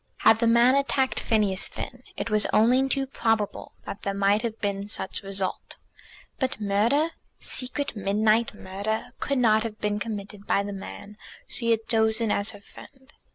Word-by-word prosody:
Had 225 Hz, -, +7 dB
the 230 Hz, -, +2 dB
man 235 Hz, +2 st, +6 dB
attacked 275 Hz, -1 st, +1 dB
Phineas 205 Hz, -4 st, 0 dB
Finn 250 Hz, -, -7 dB, 0.2 s
it 225 Hz, -, -3 dB
was 215 Hz, 0 st, +3 dB
only 250 Hz, +5 st, +4 dB
too 275 Hz, 0 st, +1 dB
probable 225 Hz, -5 st, -1 dB
that 200 Hz, -, -6 dB
there 200 Hz, 0 st, -2 dB
might 200 Hz, +2 st, +3 dB
have 230 Hz, -2 st, -4 dB
been 200 Hz, 0 st, -2 dB
such 190 Hz, -, -3 dB
result. 195 Hz, -1 st, -4 dB, 0.6 s
But 260 Hz, -5 st, -1 dB
murder, 220 Hz, +10 st, +2 dB, 0.3 s
secret 275 Hz, +2 st, -2 dB
midnight 215 Hz, +3 st, +2 dB
murder, 200 Hz, +3 st, -4 dB
could 280 Hz, -, -1 dB
not 220 Hz, -3 st, +4 dB
have 220 Hz, -1 st, -4 dB
been 210 Hz, 0 st, -1 dB
committed 205 Hz, -2 st, -6 dB
by 200 Hz, -, +2 dB
the 205 Hz, 0 st, -5 dB
man 205 Hz, +1 st, -9 dB, 0.3 s
she 230 Hz, -, -2 dB
had 225 Hz, -1 st, +1 dB
chosen 220 Hz, -1 st, +2 dB
as 200 Hz, +1 st, +2 dB
her 205 Hz, -, -7 dB
friend. 265 Hz, +6 st, -16 dB
220 Hz, 165 wpm, -26 LUFS, 205-235 Hz, 0.6 s, Had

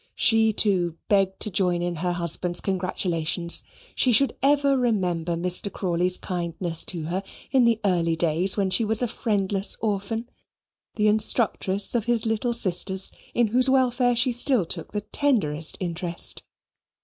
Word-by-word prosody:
She, 225 Hz, -1 st, +4 dB
too, 180 Hz, -6 st, +1 dB
begged 195 Hz, -2 st, +2 dB
to 215 Hz, -, -2 dB
join 180 Hz, -2 st, 0 dB
in 175 Hz, -1 st, -3 dB
her 175 Hz, +2 st, -1 dB
husband's 175 Hz, +1 st, 0 dB
congratulations. 175 Hz, -3 st, -1 dB, 0.3 s
She 255 Hz, -, +3 dB
should 265 Hz, +4 st, +4 dB
ever 280 Hz, 0 st, +3 dB
remember 180 Hz, -9 st, 0 dB
Mr. 180 Hz, +3 st, +1 dB
Crawley's 180 Hz, 0 st, 0 dB
kindness 170 Hz, -1 st, -4 dB
to 170 Hz, -3 st, -4 dB
her 175 Hz, +5 st, -2 dB, 0.3 s
in 235 Hz, -4 st, +3 dB
early 170 Hz, -4 st, +1 dB
days 170 Hz, +4 st, +2 dB
when 195 Hz, -2 st, 0 dB
she 185 Hz, -, +3 dB
was 220 Hz, +2 st, -1 dB
a -, -, +1 dB
friendless 200 Hz, -3 st, -2 dB
orphan, 220 Hz, +2 st, -2 dB, 0.7 s
the 215 Hz, -1 st, +2 dB
instructress 210 Hz, -2 st, +1 dB
of 235 Hz, -3 st, 0 dB
his 235 Hz, -2 st, +1 dB
little 225 Hz, +2 st, -1 dB
sisters, 190 Hz, -3 st, -2 dB, 0.2 s
in 235 Hz, -2 st, +2 dB
whose 255 Hz, +4 st, +3 dB
welfare 250 Hz, -2 st, +2 dB
she 245 Hz, +2 st, +3 dB
still 245 Hz, -4 st, +3 dB
took 165 Hz, 0 st, -5 dB
the 210 Hz, -, -2 dB
tenderest 200 Hz, -, 0 dB
interest. 170 Hz, -1 st, -3 dB
195 Hz, 150 wpm, -24 LUFS, 175-230 Hz, 0.7 s, She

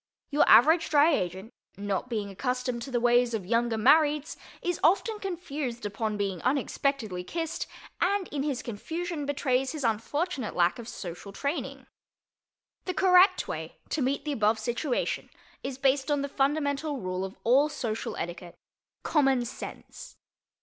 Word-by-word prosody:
Your 290 Hz, -, +4 dB
average 320 Hz, +7 st, +6 dB
Dry 305 Hz, +2 st, +5 dB
Agent, 190 Hz, 0 st, -3 dB, 0.2 s
not 200 Hz, +4 st, -2 dB
being 210 Hz, -4 st, -3 dB
accustomed 250 Hz, +3 st, -2 dB
to 270 Hz, -, -6 dB
the 245 Hz, -2 st, 0 dB
ways 240 Hz, 0 st, +3 dB
of 200 Hz, -5 st, -4 dB
Younger 230 Hz, +2 st, +1 dB
Marrieds, 300 Hz, +5 st, +4 dB, 0.3 s
is 355 Hz, -1 st, -1 dB
often 420 Hz, +6 st, +3 dB
confused 295 Hz, -, -4 dB
upon 210 Hz, +1 st, -2 dB
being 195 Hz, -4 st, -2 dB
unexpectedly 255 Hz, -7 st, -1 dB
kissed, 325 Hz, -, -3 dB, 0.3 s
and 385 Hz, +1 st, +1 dB
in 285 Hz, -, -3 dB
his 280 Hz, -3 st, -2 dB
confusion 320 Hz, +7 st, -4 dB
betrays 265 Hz, -1 st, 0 dB
his 305 Hz, -3 st, -5 dB
unfortunate 250 Hz, -, -1 dB
lack 175 Hz, +5 st, +2 dB
of 230 Hz, -, -8 dB
social 180 Hz, -1 st, -7 dB
training. 280 Hz, +10 st, -4 dB, 1.0 s
The 365 Hz, -, -3 dB
correct 370 Hz, +1 st, +5 dB
way -, -, -6 dB
to 310 Hz, -, -1 dB
meet 270 Hz, +3 st, 0 dB
the 300 Hz, -, -1 dB
above 220 Hz, -4 st, +2 dB
situation 240 Hz, +4 st, -2 dB, 0.3 s
is 265 Hz, -1 st, -5 dB
based 270 Hz, +1 st, +2 dB
on 290 Hz, -1 st, +1 dB
the -, -, -1 dB
fundamental 285 Hz, +1 st, 0 dB
rule 185 Hz, -2 st, -3 dB
of 190 Hz, 0 st, -6 dB
all 270 Hz, +6 st, +4 dB
social 235 Hz, -7 st, -4 dB
etiquette—common 240 Hz, -, -2 dB
sense. -, -, -9 dB
265 Hz, 145 wpm, -28 LUFS, 220-300 Hz, 1.0 s, average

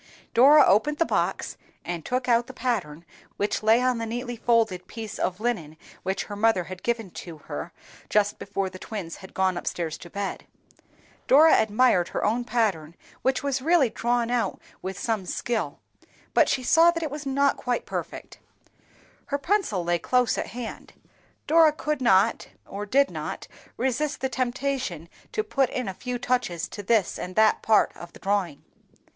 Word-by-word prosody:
Dora 280 Hz, +5 st, +7 dB
opened 260 Hz, +10 st, +3 dB
the 330 Hz, -, +2 dB
box, -, -, -1 dB, 0.3 s
and 175 Hz, -2 st, -4 dB
took 250 Hz, +6 st, -2 dB
out 235 Hz, -1 st, +3 dB
the 260 Hz, -, -9 dB
pattern 175 Hz, -12 st, -2 dB, 0.3 s
which 205 Hz, -, -1 dB
lay 220 Hz, +3 st, +4 dB
on 255 Hz, -2 st, +1 dB
the 230 Hz, -, -3 dB
neatly 245 Hz, +2 st, -4 dB
folded 220 Hz, -6 st, +1 dB
piece 220 Hz, -2 st, -7 dB
of 185 Hz, +1 st, -1 dB
linen 200 Hz, -10 st, -2 dB, 0.2 s
which 190 Hz, +1 st, -2 dB
her 205 Hz, -, -7 dB
mother 210 Hz, -3 st, +2 dB
had 185 Hz, +1 st, -9 dB
given 230 Hz, -5 st, -2 dB
to 170 Hz, -2 st, -9 dB
her 75 Hz, -, -7 dB, 0.4 s
just 205 Hz, -1 st, +1 dB
before 195 Hz, -1 st, -2 dB
the 185 Hz, 0 st, -9 dB
twins 190 Hz, -7 st, -6 dB
had 190 Hz, -1 st, -13 dB
gone 190 Hz, -1 st, +1 dB
up -, -, -11 dB
stairs 165 Hz, -2 st, -3 dB
to 175 Hz, -, -11 dB
bed. 200 Hz, +1 st, -5 dB, 0.8 s
Dora 315 Hz, +4 st, +7 dB
admired 215 Hz, -4 st, +3 dB
her -, -, -2 dB
own 230 Hz, +4 st, +1 dB
pattern, 190 Hz, -10 st, 0 dB, 0.3 s
which 265 Hz, +1 st, 0 dB
was 275 Hz, -2 st, -1 dB
realty 305 Hz, -5 st, +3 dB
drawn 235 Hz, +1 st, 0 dB
out 245 Hz, -1 st, 0 dB, 0.2 s
with 190 Hz, 0 st, -5 dB
some 220 Hz, -5 st, -2 dB
skill, 235 Hz, +3 st, -2 dB, 0.6 s
but -, -, +4 dB
she 255 Hz, -, 0 dB
saw 330 Hz, +6 st, +6 dB
that 335 Hz, -1 st, -1 dB
it 310 Hz, -, -3 dB
was 295 Hz, -1 st, -6 dB
not 280 Hz, +1 st, +2 dB
quite 245 Hz, -1 st, -2 dB
perfect. -, -, -6 dB, 0.9 s
Her 280 Hz, -, -1 dB
pencil 285 Hz, -, 0 dB
lay 175 Hz, 0 st, +1 dB
close 250 Hz, +3 st, +2 dB
at -, -, -3 dB
hand; 240 Hz, -2 st, -8 dB, 0.5 s
Dora 320 Hz, 0 st, +6 dB
could 300 Hz, -2 st, -2 dB
not, 205 Hz, -2 st, +3 dB, 0.2 s
or 205 Hz, +1 st, -6 dB
did 275 Hz, +5 st, +3 dB
not, -, -, -5 dB, 0.3 s
resist 265 Hz, +4 st, -1 dB
the 265 Hz, -, 0 dB
temptation 255 Hz, -, -2 dB, 0.2 s
to 430 Hz, -, -1 dB
put 270 Hz, -, +1 dB
in 255 Hz, -3 st, -3 dB
a 190 Hz, -, -3 dB
few 250 Hz, +5 st, -4 dB
touches 240 Hz, -9 st, -1 dB
to 205 Hz, -, -7 dB
this 205 Hz, -2 st, +1 dB
and 180 Hz, 0 st, -6 dB
that 220 Hz, 0 st, +4 dB
part 220 Hz, -1 st, +3 dB
of 175 Hz, 0 st, -11 dB
the -, -, -14 dB
drawing. 195 Hz, -7 st, -1 dB
230 Hz, 175 wpm, -25 LUFS, 190-255 Hz, 0.9 s, Dora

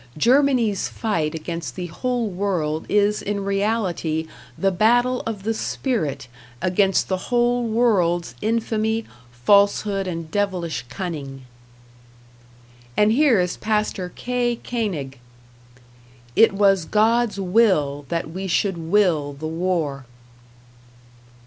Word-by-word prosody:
Germany's 245 Hz, -, +3 dB
fight 165 Hz, -9 st, -2 dB
against 165 Hz, +1 st, -5 dB
the 180 Hz, -, -4 dB
whole 240 Hz, +7 st, -2 dB
world 180 Hz, -6 st, -2 dB
is 210 Hz, 0 st, +2 dB
in 200 Hz, -1 st, -3 dB
reality 195 Hz, -6 st, -1 dB, 0.3 s
the 195 Hz, 0 st, +1 dB
battle 245 Hz, +6 st, +2 dB
of 210 Hz, -4 st, -4 dB
the 225 Hz, +2 st, 0 dB
spirit 220 Hz, -, -2 dB, 0.3 s
against 190 Hz, +1 st, +2 dB
the 185 Hz, -1 st, -3 dB
whole 240 Hz, 0 st, +2 dB
world's 195 Hz, -7 st, +1 dB
infamy, 220 Hz, 0 st, 0 dB, 0.3 s
falsehood 200 Hz, -, +2 dB
and 165 Hz, -3 st, -5 dB
devilish 180 Hz, -10 st, -1 dB
cunning. 140 Hz, -4 st, -6 dB, 1.5 s
And 210 Hz, +1 st, +4 dB
here 260 Hz, -3 st, +4 dB
is 180 Hz, 0 st, -1 dB
Pastor 210 Hz, -4 st, -1 dB
K. 245 Hz, -1 st, -1 dB
Koenig: 165 Hz, -, -3 dB, 1.2 s
It 225 Hz, -, +6 dB
was 195 Hz, -3 st, +3 dB
God's 225 Hz, +1 st, +2 dB
will 180 Hz, -9 st, +2 dB
that 170 Hz, -1 st, -2 dB
we 190 Hz, +3 st, -5 dB
should 190 Hz, 0 st, 0 dB
will 165 Hz, -4 st, +1 dB
the 140 Hz, +3 st, -8 dB
war. 160 Hz, -6 st, -2 dB
195 Hz, 110 wpm, -22 LUFS, 165-225 Hz, 1.5 s, It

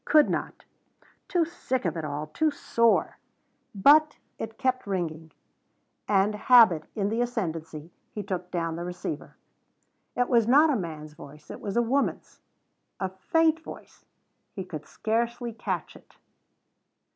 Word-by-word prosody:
Could 305 Hz, -1 st, +4 dB
not. -, -, -4 dB, 0.6 s
Too 350 Hz, -3 st, +2 dB
sick 260 Hz, -, -3 dB
of 170 Hz, -, 0 dB
it 165 Hz, -, -4 dB
all 150 Hz, 0 st, -3 dB
too 310 Hz, -, 0 dB
sore. 230 Hz, -5 st, +1 dB, 0.6 s
But 300 Hz, +9 st, +5 dB, 0.2 s
it 225 Hz, 0 st, -6 dB
kept 255 Hz, -3 st, -1 dB
ringing, 165 Hz, -4 st, -3 dB, 0.8 s
and, 200 Hz, +1 st, +3 dB
habit 210 Hz, -8 st, +5 dB
in 200 Hz, -2 st, 0 dB
the 225 Hz, +2 st, 0 dB
ascendency, 165 Hz, -9 st, -4 dB, 0.2 s
he 210 Hz, -, -5 dB
took 180 Hz, -2 st, -4 dB
down 165 Hz, -2 st, -2 dB
the 170 Hz, -, -4 dB
receiver. 175 Hz, -4 st, -6 dB, 0.8 s
It 245 Hz, 0 st, +1 dB
was 235 Hz, -3 st, +3 dB
not 295 Hz, +5 st, +6 dB
a -, -, +1 dB
man's 155 Hz, -6 st, -5 dB
voice. 150 Hz, -1 st, -13 dB
It -, -, -9 dB
was 200 Hz, +2 st, -3 dB
a 240 Hz, -, +4 dB
woman's. 270 Hz, +4 st, -1 dB, 0.6 s
A 190 Hz, -, -1 dB
faint 320 Hz, -, +1 dB
voice -, -, -12 dB, 0.5 s
he 190 Hz, -3 st, -5 dB
could 155 Hz, -4 st, -8 dB
scarcely 235 Hz, +1 st, -2 dB
catch -, -, -4 dB
it. -, -, -19 dB
205 Hz, 145 wpm, -27 LUFS, 165-245 Hz, 0.8 s, not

